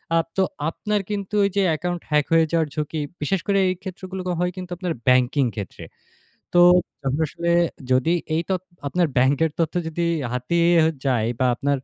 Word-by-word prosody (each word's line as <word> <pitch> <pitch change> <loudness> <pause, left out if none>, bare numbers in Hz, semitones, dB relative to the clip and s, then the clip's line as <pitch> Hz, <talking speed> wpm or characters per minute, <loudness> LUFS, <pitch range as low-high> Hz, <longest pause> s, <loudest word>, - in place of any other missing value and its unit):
আ - - +5 0.2
তো 190 - +4 0.3
আপনার 210 +4 -2
কিন্তু 205 -1 -4
ওই 200 - +3
যে 200 - +3
অ্যাকাউন্ট 175 +2 -2
হ্যাক 150 -1 +2
হয়ে 165 -1 +5
যাওয়ার 165 -2 +2
ঝুঁকি, 150 +1 -2 0.2
বিশেষ 190 +5 0
করে 200 -1 +2
এই - - +1
ক্ষেত্রগুলো 190 0 -6 0.2
হয় 180 0 0
কিন্তু 180 -1 -7
আপনার 180 -1 -2
ব্যাংকিং 125 +2 +4
ক্ষেত্রে। 100 -5 -7 0.7
তো - - +5 0.5
আপনি 140 +4 0
আসলে 170 +2 -2 0.4
যদি 130 +7 +3 0.2
এই 165 - +1
তথ্য 185 -1 -1 0.2
আপনার 175 +3 +1
ব্যাংকের 140 +5 +3
তথ্য 165 0 0
যদি 170 +1 -2 0.3
হাতিয়ে 170 +8 +1 0.4
যায় 115 -4 +1
বা 130 - +2
আপনার 140 +3 0
165 Hz, 170 wpm, -23 LUFS, 140-180 Hz, 0.7 s, আ